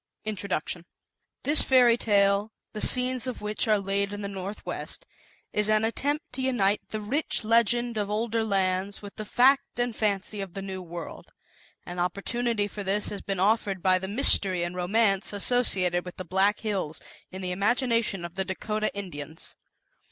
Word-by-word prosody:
INTRODUCTION 185 -5 -3 0.6
This 295 +2 +7
Fairy 250 -3 +5
Tale, 200 -1 +2 0.2
the 215 - -5
scenes 255 0 +5
of 250 - -4
which 210 +2 -2
are 215 -1 +4
laid 200 0 -1
in 205 0 -6
the - - -2
Northwest, 195 +1 -6 0.5
is 210 0 +1
an 215 0 +3
attempt 290 +8 -1
to 260 - -3
unite 215 -6 +1
the 215 - -4
rich 245 +6 -2
Legend 235 +1 +2
of 205 -1 -2
Older 225 +1 -1
Lands 195 -1 -1
with 200 - -10
the 215 - -5
Fact 265 +5 +3
and 245 -2 -1
Fancy 205 -1 -1
of 190 -3 -8
the 195 - -4
New 190 -1 -6
World. 170 -1 -9 0.5
An 175 0 -6
opportunity 205 +5 -1
for 205 0 -7
this 200 +2 -1
has 205 - -6
been 195 -2 -3
offered 200 -2 +1
by 185 -1 +4
the 190 - -5
Mystery 195 -5 +5
and 175 +1 -4
Romance 195 +2 +1
associated 195 -5 +2
with 180 - -9
the 185 - -6
Black 190 +4 +1
Hills 195 -8 -3 0.3
in 190 +1 -8
the 180 - -2
imagination 225 -1 0
of 170 - -8
the 190 +1 -2
Dakota 215 +3 -2
Indians. 160 -6 -7
205 Hz, 170 wpm, -27 LUFS, 190-230 Hz, 0.6 s, This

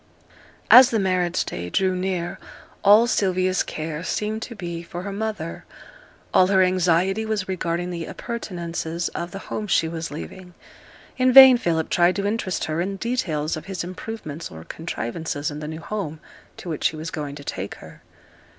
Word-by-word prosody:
As 255 0 +10
the 230 - +1
marriage 185 -3 +1
day 85 +1 -5
drew 185 - +1
near, 180 -2 -2 0.4
all 210 +3 +7
Sylvia's 185 -5 +1
care 155 0 -4
seemed 215 +3 -2
to 235 - -7
be 170 -4 -5
for 175 +1 -7
her 200 - -4
mother; 205 -5 -4 0.7
all 185 - +6
her 190 -1 +4
anxiety 185 +2 +2
was 215 -3 -2
regarding 175 -1 -2
the 170 -2 -5
appurtenances 175 -7 -4
of 170 - -5
the 195 - -7 0.2
home 215 - -3
she 165 -4 +2
was 165 0 -4
leaving. 180 +4 -9 0.6
In 255 0 +4
vain 265 0 +11
Philip 165 -8 0
tried 175 +1 +4
to 200 0 -2
interest 205 -3 -1
her 160 +1 -1
in 195 +2 -2
details 175 -10 -1
of 155 0 -8
his 190 -2 -4
improvements 180 -3 -7
or 80 0 -10
contrivances 155 - -4
in 145 - -6
the 150 - -6
new 160 +1 -6
home 165 -6 -4 0.4
to - - -10
which 155 - +1
he - - -5
was 155 +1 -6
going 145 -4 -5
to 145 - -10
take 100 -6 -5
her. - - -14
180 Hz, 175 wpm, -23 LUFS, 160-200 Hz, 0.7 s, vain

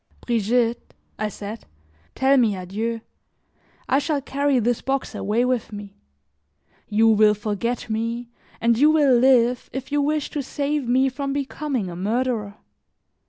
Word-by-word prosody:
"Brigitte," 235 +1 0 0.2
I 215 - -1
said, 210 +2 -8 0.5
"tell 270 +1 +3
me 230 -6 +3
adieu. 215 +5 -4 0.9
I 270 - +3
shall 295 0 -1
carry 280 0 0
this 240 0 0
box 270 0 -2
away 220 +5 0
with 250 -3 -1
me; 205 -1 -9 0.9
you 220 +2 +3
will 215 -1 +5
forget 215 +3 -3
me, 230 +2 -3 0.3
and 230 0 +2
you 295 +2 +6
will 295 -5 +4
live 245 -1 +3
if 265 +1 -6
you 290 0 +2
wish 300 0 -1
to 295 - -2
save 285 0 -2
me 260 +2 +3
from 275 +1 -3
becoming 275 -5 -3
a 175 - -7
murderer. 215 +1 -1
240 Hz, 145 wpm, -23 LUFS, 215-270 Hz, 0.9 s, you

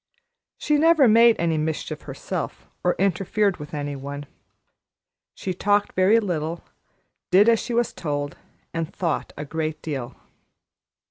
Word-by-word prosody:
She 300 -1 +1
never 320 -4 +6
made 230 +1 +6
any 165 -2 +1
mischief 155 0 -3
herself - - -5 0.2
or 180 - +2
interfered 195 +1 +1
with 150 -2 -9
any 145 -1 -3
one. 140 +1 -6 1.1
She 185 - -3
talked 205 +2 +1
very 190 +5 +4
little, 170 -5 -3 0.7
did 195 +4 +6
as 230 -1 +5
she 240 - -3
was 240 -1 +1
told, 145 -2 -3 0.4
and 165 0 -3
thought 170 -4 -2
a 150 - -5
great 155 0 -3
deal. 135 -6 -4
175 Hz, 135 wpm, -24 LUFS, 150-210 Hz, 1.1 s, never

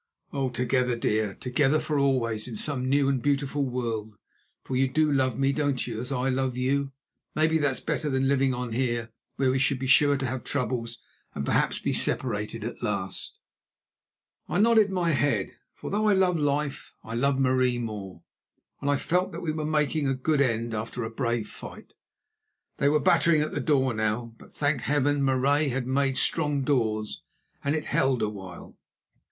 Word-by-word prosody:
together, 125 0 +1
dear; 110 -3 0
together 135 +4 +1
for 150 -2 -1
always 120 -6 0
in 115 -3 -6
some 130 -1 -2
new 140 0 +3
and 135 -2 +1
beautiful 140 0 0
world, 115 -4 -3 0.5
for 130 - -4
you 135 +1 +3
do 155 +3 +2
love 130 -4 +1
me, 135 0 +2
don't 145 -4 0
you, 115 -2 -4
as 125 - -5
I 130 -1 0
love 130 -1 0
you? 135 +2 0 0.4
Maybe 160 +1 +3
that's 145 -3 0
better 155 -1 -2
than 135 -1 +1
living 135 -1 +2
on 125 -2 -3
here 120 -2 -1 0.2
where 130 -1 +2
we 130 - +1
should 135 +1 +2
be 130 - -4
sure 145 +2 +5
to 135 - -3
have 125 -1 -3
troubles 120 -3 -3 0.3
and 70 - -3
perhaps - - +1
be - - -2
separated - - 0
at - - -6
last." - - -3 1.1
I - - 0
nodded 220 0 +5
my 180 -3 +1
head, 135 - +1 0.2
for - - -7
though 215 +2 +1
I 210 - +5
loved 185 -3 +2
life, 145 -1 -2
I 115 - -7
loved 135 +3 +1
Marie 130 -2 +2
more, 100 -7 -6 0.6
and 140 - -1
I 145 - +3
felt 180 +6 0
that - - -6
we 160 - -1
were 155 0 -3
making 150 -1 +1
a 135 - +1
good 140 +3 +1
end 115 -3 0
after 115 +2 -4
a 110 - -4
brave 115 -2 -1
fight. - - -10 0.9
They 140 - +4
were 150 +1 +3
battering 155 +2 +4
at 155 - -4
the - - -2
door 135 -5 +2
now, 110 +2 -2
but, - - -16
thank 145 -3 0
Heaven, 145 0 +1
Marais 140 +3 +2
had 125 0 -2
made 135 +1 +1
strong 145 -2 +1
doors, 110 -6 0 0.4
and 140 +2 +1
it 155 - -3
held 135 -3 +1
a 105 - +1
while. 95 -4 -10
135 Hz, 185 wpm, -27 LUFS, 120-145 Hz, 1.1 s, sure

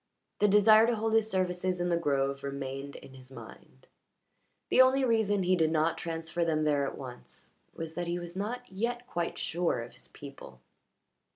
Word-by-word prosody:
The 210 - +4
desire 215 +2 +6
to 240 - +1
hold 220 0 -1
his 220 -1 +3
services 185 -1 -1
in 175 0 0
the 170 - +2
grove 140 -4 0
remained 140 0 -5
in 135 - -12
his 130 0 -14
mind; - - -13 0.8
the - - +7
only 260 +1 +4
reason 215 -4 +2
he 185 +1 +3
did 160 -3 +2
not 160 +1 +1
transfer 165 +1 -3
them 155 -2 +1
there 145 -2 +1
at - - -6
once 125 -2 -9 0.2
was 165 -1 -6
that 175 +1 -4
he 170 +1 -1
was 175 0 -7
not 240 +6 -4
yet 235 +6 -3
quite 170 -8 -3
sure 165 -8 -1
of 120 - -12
his - - -11
people. 140 - -12
175 Hz, 185 wpm, -30 LUFS, 145-210 Hz, 0.8 s, the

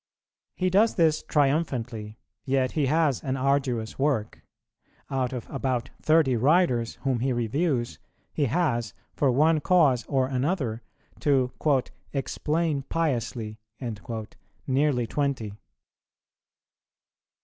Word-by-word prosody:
He 185 0 0
does 215 +4 +4
this 160 -3 +3
triumphantly, 125 -8 -1 0.3
yet 130 -1 +1
he 150 -4 0
has 150 -3 +2
an 135 -2 -1
arduous 130 -4 0
work; 135 -7 0 0.7
out 130 -2 0
of 125 -3 -5
about 130 -3 -2
thirty 155 -5 +4
writers 125 -3 +2
whom 130 -4 +1
he 130 +3 0
reviews, 120 +2 -1 0.3
he 145 - +1
has, 120 - 0 0.2
for 140 - +2
one 155 +5 +4
cause 145 -9 +4
or 130 -3 +1
other, 130 - -1 0.4
to 130 -4 +2 0.6
"explain 150 +2 -1
piously" 120 -8 -2 1.1
nearly 135 -2 +1
twenty. 130 -5 -2
135 Hz, 105 wpm, -26 LUFS, 120-150 Hz, 1.1 s, does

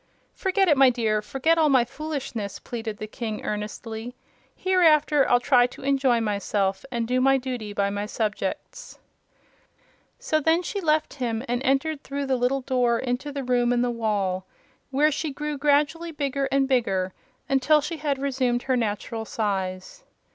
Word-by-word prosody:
"Forget 385 0 +1
it, 300 -4 +4
my 270 -1 +7
dear; 220 -4 0
forget 295 +9 +1
all 310 -2 +4
my 260 -4 +4
foolishness," 260 -7 -5
pleaded 225 -3 -6
the 215 - -5
King, 215 0 -5
earnestly. 220 +3 -5 0.4
"Hereafter 310 -6 +3
I'll 245 - +5
try 245 -1 +4
to 250 - -13
enjoy 270 -3 +2
myself 200 -2 -1
and 235 -2 -2
do 255 +1 +1
my 270 +1 +4
duty 250 -5 -5
by 200 -1 0
my 205 +1 -3
subjects." 215 - -4 1.2
So 480 -11 0
then 325 +3 +2
she 400 +2 -3
left 310 -2 +1
him 230 -1 -1
and 245 +1 -1
entered 275 +3 0
through 280 0 -4
the 265 -1 +1
little 255 +2 0
door 250 -2 +1
into 250 +4 -3
the 280 -1 -4
room 245 -1 +2
in 245 0 +2
the 245 - 0
wall, 200 -5 -1 0.4
where 290 +3 +3
she 310 +2 -2
grew 300 +2 -4
gradually 300 +4 +1
bigger 275 -2 -2
and 275 0 +2
bigger 195 -8 0 0.3
until 275 +3 +4
she 310 +3 -4
had 290 -2 -1
resumed 255 -3 0
her 260 - +1
natural 225 0 -2
size. 195 - -3
255 Hz, 165 wpm, -25 LUFS, 225-290 Hz, 1.2 s, my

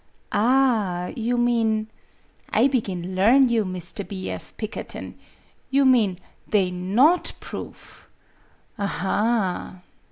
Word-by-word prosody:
"Ah, 220 -7 +2
you 240 +1 -1
mean 225 -3 +1 0.6
I - - +4
begin 190 -9 -2
learn 240 +8 +5
you, 230 -2 +2
Mr. 185 +2 -5
B. 190 -2 -5
F. - - -8
Pikkerton! 215 -1 -6 0.6
You 275 +1 +3
mean 225 -8 +4 0.3
they 195 -4 +2
not 215 - +2
proof. - - -10 0.7
Aha!" 195 -1 -1
215 Hz, 100 wpm, -24 LUFS, 185-240 Hz, 0.7 s, learn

